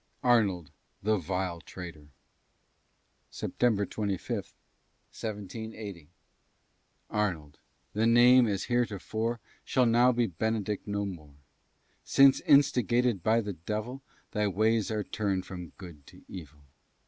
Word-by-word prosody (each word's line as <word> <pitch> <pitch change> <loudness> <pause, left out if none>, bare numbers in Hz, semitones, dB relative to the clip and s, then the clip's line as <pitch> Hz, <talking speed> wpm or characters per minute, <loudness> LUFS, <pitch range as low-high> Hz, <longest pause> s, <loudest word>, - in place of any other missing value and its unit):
ARNOLD 100 - +2 0.3
THE 110 +1 +2
VILE 90 0 -3
TRAITOR 85 -4 -10 1.2
[September 110 -5 0
25, 100 -2 -3
1780] 105 -4 -8 1.0
Arnold! 90 -9 -2 0.3
the 110 +2 +2
name, 120 +1 +6
as 100 -3 -1
heretofore, 115 -1 -1 0.2
Shall 130 -2 +2
now 120 +2 +5
be 120 -1 +1
Benedict 105 +2 -2
no 100 0 -1
more: 75 -7 -8 0.7
Since, 135 -1 +5
instigated 125 -5 +4
by 110 +5 +3
the 105 -2 -4
devil, 105 - -5 0.3
Thy 105 -1 0
ways 110 +2 +1
are 110 -1 -1
turned 95 -3 -2
from 90 -3 -8
good 85 -7 -12
to - - -16
evil. 75 -5 -10
105 Hz, 110 wpm, -29 LUFS, 90-115 Hz, 1.2 s, name